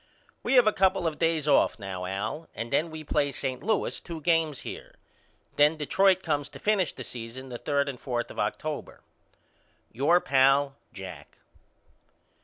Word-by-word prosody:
We -, -, +1 dB
have 250 Hz, -3 st, +7 dB
a 215 Hz, -, +4 dB
couple 190 Hz, -1 st, +2 dB
of 160 Hz, -2 st, -1 dB
days 165 Hz, -3 st, +1 dB
off 145 Hz, -, +4 dB
now 95 Hz, -3 st, -5 dB
Al 105 Hz, -, -4 dB
and 115 Hz, +3 st, -5 dB
then 160 Hz, +4 st, +2 dB
we 155 Hz, 0 st, -7 dB
play 145 Hz, -1 st, +1 dB
St. 130 Hz, -1 st, -3 dB
Louis 220 Hz, -1 st, 0 dB
two 165 Hz, -2 st, -7 dB
games 160 Hz, -3 st, +1 dB
here. -, -, -8 dB, 0.6 s
Then 150 Hz, +2 st, +5 dB
Detroit 190 Hz, +5 st, +3 dB
comes 145 Hz, -3 st, -1 dB
to -, -, -11 dB
finish 205 Hz, -6 st, +1 dB
the 130 Hz, -, -8 dB
season 120 Hz, +2 st, -7 dB
the 120 Hz, -1 st, -6 dB
third 140 Hz, -1 st, 0 dB
and 135 Hz, -3 st, -5 dB
fourth 120 Hz, -3 st, -3 dB
of -, -, -8 dB
October. -, -, -3 dB, 0.9 s
Your 145 Hz, +9 st, +3 dB
pal, 135 Hz, -1 st, +3 dB, 0.2 s
JACK. 95 Hz, -3 st, -10 dB
145 Hz, 165 wpm, -27 LUFS, 130-165 Hz, 0.9 s, have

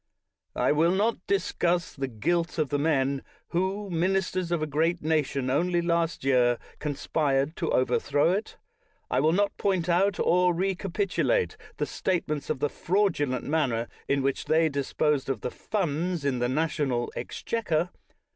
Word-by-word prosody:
I -, -, +2 dB
will 165 Hz, +4 st, +3 dB
not 215 Hz, +4 st, +1 dB
discuss 180 Hz, -3 st, 0 dB
the 135 Hz, -1 st, -3 dB
guilt 170 Hz, +10 st, -1 dB
of 155 Hz, -4 st, +1 dB
the 145 Hz, -, 0 dB
men 140 Hz, -3 st, +1 dB, 0.3 s
who, 190 Hz, +4 st, -1 dB
ministers 185 Hz, +1 st, 0 dB
of 170 Hz, -3 st, +1 dB
a -, -, +1 dB
great 160 Hz, +3 st, 0 dB
nation 145 Hz, -4 st, 0 dB
only 175 Hz, +5 st, +2 dB
last 170 Hz, -3 st, 0 dB
year, 125 Hz, -3 st, +3 dB, 0.2 s
con 150 Hz, -2 st, -2 dB
spired 140 Hz, +1 st, 0 dB
to 165 Hz, -, -1 dB
overthrow 145 Hz, +4 st, +2 dB
it. 200 Hz, +4 st, -3 dB, 0.5 s
I 125 Hz, -, +2 dB
will 155 Hz, +4 st, +3 dB
not 200 Hz, +4 st, +1 dB
point 185 Hz, -4 st, 0 dB
out 190 Hz, +3 st, +2 dB
or 180 Hz, 0 st, +3 dB
recapitulate 195 Hz, -, 0 dB, 0.2 s
the -, -, 0 dB
statements 155 Hz, -6 st, -2 dB
of 155 Hz, -, 0 dB
the 145 Hz, -, +3 dB
fraudulent 165 Hz, -10 st, 0 dB
manner 130 Hz, -7 st, 0 dB, 0.2 s
in 140 Hz, -1 st, +1 dB
which 135 Hz, 0 st, -1 dB
they 160 Hz, +1 st, +3 dB
disposed 140 Hz, 0 st, 0 dB
of 130 Hz, -5 st, -2 dB
the 125 Hz, -, -3 dB
funds 175 Hz, -4 st, -2 dB
in 130 Hz, -3 st, +1 dB
the 120 Hz, 0 st, +1 dB
national 140 Hz, -4 st, 0 dB
exchequer. 180 Hz, -7 st, -2 dB
160 Hz, 155 wpm, -27 LUFS, 140-180 Hz, 0.5 s, will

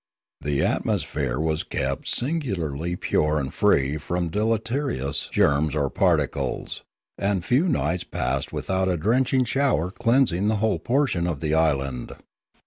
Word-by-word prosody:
The 70 Hz, -1 st, 0 dB
atmosphere 65 Hz, -3 st, -1 dB
was 80 Hz, 0 st, 0 dB
kept 70 Hz, 0 st, -3 dB
singularly 90 Hz, -, -1 dB
pure 75 Hz, -3 st, +1 dB
and 70 Hz, -2 st, -3 dB
free 70 Hz, +2 st, +2 dB
from 85 Hz, +3 st, -2 dB
deleterious 110 Hz, -, -1 dB
germs 75 Hz, +1 st, +2 dB
or 70 Hz, -3 st, 0 dB
particles, -, -, 0 dB, 0.4 s
and 100 Hz, -3 st, 0 dB
few 130 Hz, -, +3 dB
nights 85 Hz, -, 0 dB
passed -, -, -2 dB
without 95 Hz, -1 st, -1 dB
a 90 Hz, -, +1 dB
drenching 125 Hz, +7 st, +2 dB
shower 125 Hz, -, +1 dB
cleansing 115 Hz, -4 st, +2 dB
the 110 Hz, -, +2 dB
whole 110 Hz, +1 st, +1 dB
lower -, -, -1 dB
portion 125 Hz, -10 st, +1 dB
of 80 Hz, -5 st, -2 dB
the 75 Hz, +1 st, -1 dB
island. 70 Hz, -5 st, 0 dB
90 Hz, 135 wpm, -24 LUFS, 75-115 Hz, 0.4 s, few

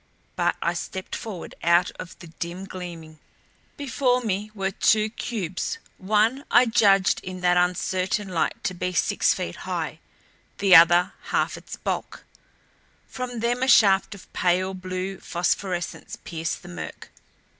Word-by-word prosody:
But -, -, +1 dB
I -, -, +1 dB
stepped 190 Hz, -1 st, -5 dB
forward, 210 Hz, -7 st, -7 dB
out 170 Hz, +1 st, +3 dB
of 180 Hz, -, -8 dB
the -, -, -12 dB
dim 170 Hz, +3 st, -6 dB
gleaming. 170 Hz, -4 st, -9 dB, 0.6 s
Before 260 Hz, -2 st, +1 dB
me 210 Hz, -3 st, -2 dB
were 195 Hz, -1 st, -1 dB
two 215 Hz, +2 st, +3 dB
cubes; 215 Hz, -, -3 dB, 0.2 s
one 215 Hz, +7 st, +2 dB
I 245 Hz, +1 st, +6 dB
judged 200 Hz, -4 st, +4 dB
in 185 Hz, 0 st, -7 dB
that 180 Hz, 0 st, +3 dB
uncertain 185 Hz, +3 st, 0 dB
light 180 Hz, -3 st, -1 dB
to 185 Hz, -, -1 dB
be 180 Hz, +1 st, -3 dB
six -, -, +2 dB
feet -, -, -5 dB
high, -, -, -4 dB, 0.6 s
the 195 Hz, -2 st, +6 dB
other 175 Hz, +3 st, +7 dB
half -, -, 0 dB
its -, -, -9 dB
bulk. -, -, -4 dB, 0.8 s
From 245 Hz, -2 st, -5 dB
them 240 Hz, +2 st, 0 dB
a 260 Hz, -, +2 dB
shaft 200 Hz, -4 st, +5 dB
of 195 Hz, -, -16 dB
pale 185 Hz, +1 st, +1 dB
blue 185 Hz, +1 st, -5 dB
phosphorescence 175 Hz, 0 st, -2 dB
pierced 165 Hz, -1 st, -4 dB
the -, -, -10 dB
murk. 80 Hz, -4 st, -8 dB
185 Hz, 145 wpm, -25 LUFS, 175-215 Hz, 0.8 s, other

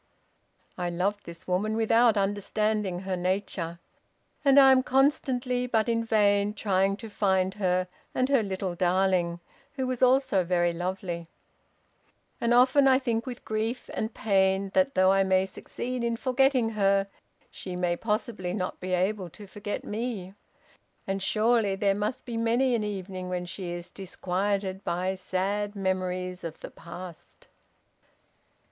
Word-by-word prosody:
"I 175 Hz, -1 st, -1 dB
loved 195 Hz, +4 st, -1 dB
this 170 Hz, 0 st, -10 dB
woman 205 Hz, +4 st, 0 dB
without 225 Hz, 0 st, +4 dB
understanding 205 Hz, -1 st, 0 dB
her 190 Hz, -1 st, -2 dB
nature; 180 Hz, -2 st, -2 dB, 0.7 s
and 280 Hz, -1 st, +6 dB
I 270 Hz, -1 st, +8 dB
am 260 Hz, -1 st, +5 dB
constantly, 255 Hz, -2 st, +1 dB
but 220 Hz, -2 st, +1 dB
in 230 Hz, -1 st, +1 dB
vain, 205 Hz, -2 st, +2 dB
trying 195 Hz, -1 st, +1 dB
to 225 Hz, -, -8 dB
find 190 Hz, -3 st, +1 dB
her 185 Hz, -2 st, 0 dB, 0.3 s
and 255 Hz, -, +2 dB
her 275 Hz, -3 st, +3 dB
little 190 Hz, -2 st, -3 dB
darling, 180 Hz, -1 st, +1 dB, 0.3 s
who 265 Hz, -2 st, -2 dB
was 255 Hz, -1 st, -3 dB
also 255 Hz, -6 st, +4 dB
very 175 Hz, -1 st, +1 dB
lovely; 175 Hz, -1 st, -4 dB, 1.1 s
and 235 Hz, -, +1 dB
often 255 Hz, +3 st, +5 dB
I 260 Hz, -1 st, +6 dB
think 235 Hz, -2 st, -2 dB
with 245 Hz, -2 st, -7 dB
grief 220 Hz, +3 st, -3 dB
and 220 Hz, -, -2 dB
pain 195 Hz, -2 st, +1 dB
that, 275 Hz, -1 st, +2 dB
though 185 Hz, 0 st, +5 dB
I 195 Hz, 0 st, +4 dB
may 190 Hz, 0 st, +2 dB
succeed 245 Hz, +5 st, -5 dB
in 235 Hz, -1 st, 0 dB
forgetting 255 Hz, -2 st, +2 dB
her, 195 Hz, -2 st, +2 dB, 0.5 s
she 185 Hz, -1 st, -7 dB
may 180 Hz, -1 st, 0 dB
possibly 210 Hz, -3 st, -2 dB
not 185 Hz, -3 st, -3 dB
be 185 Hz, 0 st, -3 dB
able 185 Hz, 0 st, -1 dB
to 205 Hz, +5 st, -12 dB
forget 205 Hz, +1 st, -5 dB
me, 210 Hz, -4 st, -4 dB, 0.7 s
and, 195 Hz, 0 st, -2 dB
surely, 215 Hz, 0 st, +2 dB
there 195 Hz, 0 st, +2 dB
must 210 Hz, +4 st, -3 dB
be 235 Hz, -2 st, -4 dB
many 235 Hz, +3 st, +2 dB
an 225 Hz, -2 st, +1 dB
evening 190 Hz, -3 st, -5 dB
when 180 Hz, -1 st, -2 dB
she 185 Hz, 0 st, -6 dB
is 175 Hz, 0 st, -6 dB
disquieted 190 Hz, +1 st, -2 dB
by 180 Hz, +2 st, -1 dB
sad 195 Hz, +2 st, -2 dB
memories 185 Hz, -1 st, -2 dB
of 165 Hz, -1 st, -6 dB
the -, -, -8 dB
past. 175 Hz, 0 st, -11 dB
200 Hz, 150 wpm, -27 LUFS, 185-230 Hz, 1.1 s, I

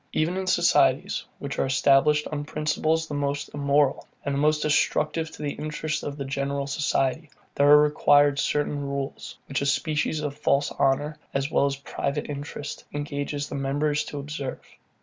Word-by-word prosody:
Even 165 Hz, +3 st, +1 dB
in 190 Hz, 0 st, -3 dB
societies, -, -, +3 dB
which -, -, -5 dB
are -, -, +2 dB
established 140 Hz, +2 st, +4 dB
on 145 Hz, -1 st, -3 dB
principles 155 Hz, +2 st, 0 dB
the 150 Hz, -, -6 dB
most 145 Hz, 0 st, -2 dB
immoral, 140 Hz, -1 st, +1 dB, 0.2 s
and 140 Hz, -, -1 dB
the 140 Hz, -, 0 dB
most 150 Hz, +1 st, +2 dB
destructive 155 Hz, +1 st, +1 dB
to 150 Hz, -, -9 dB
the 145 Hz, -, -1 dB
interests 155 Hz, 0 st, -3 dB
of 145 Hz, 0 st, -5 dB
the 140 Hz, -, -4 dB
general 140 Hz, +1 st, -2 dB
society, 145 Hz, +1 st, 0 dB, 0.2 s
there 145 Hz, 0 st, +3 dB
are 150 Hz, 0 st, +9 dB
required 145 Hz, -1 st, +4 dB
certain 145 Hz, 0 st, 0 dB
rules, 140 Hz, -1 st, -5 dB
which 140 Hz, -, -2 dB
a -, -, 0 dB
species 155 Hz, +1 st, 0 dB
of 145 Hz, -2 st, -3 dB
false 145 Hz, -1 st, +1 dB
honour, 145 Hz, +3 st, 0 dB, 0.2 s
as 135 Hz, +2 st, -1 dB
well 140 Hz, -, +3 dB
as 140 Hz, -, -1 dB
private 140 Hz, +1 st, -3 dB
interest, 145 Hz, +1 st, -6 dB
engages 145 Hz, 0 st, -3 dB
the -, -, -8 dB
members 145 Hz, +2 st, 0 dB
to 145 Hz, -, -7 dB
observe. 140 Hz, -1 st, -5 dB
145 Hz, 170 wpm, -25 LUFS, 140-150 Hz, 0.2 s, are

